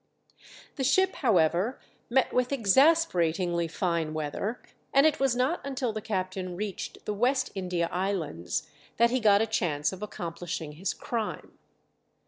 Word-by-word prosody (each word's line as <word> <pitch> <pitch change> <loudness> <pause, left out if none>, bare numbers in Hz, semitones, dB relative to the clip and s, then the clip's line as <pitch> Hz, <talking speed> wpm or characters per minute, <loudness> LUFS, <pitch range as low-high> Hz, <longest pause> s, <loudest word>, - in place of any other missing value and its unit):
The 270 - -1
ship, 375 +8 +3
however, 190 - +2 0.3
met 260 +2 +2
with 250 +1 +1
exasperatingly 190 - +3
fine 165 -2 -1
weather, 155 +10 -3 0.3
and 275 +2 +5
it 310 -1 +3
was 270 -3 +2
not 255 +7 +1
until 265 -4 -2
the 215 - -4
captain 185 -3 -3
reached 205 +1 -5
the 210 - -1
West 255 +5 +1
India 180 -3 -1
Islands 175 - -2 0.3
that 235 +1 +4
he 255 - +2
got 210 -2 +5
a - - +1
chance 165 -8 0
of 190 - -9
accomplishing 170 -5 -5
his 170 +6 -3
crime. 225 -3 -4
200 Hz, 140 wpm, -28 LUFS, 175-250 Hz, 0.3 s, and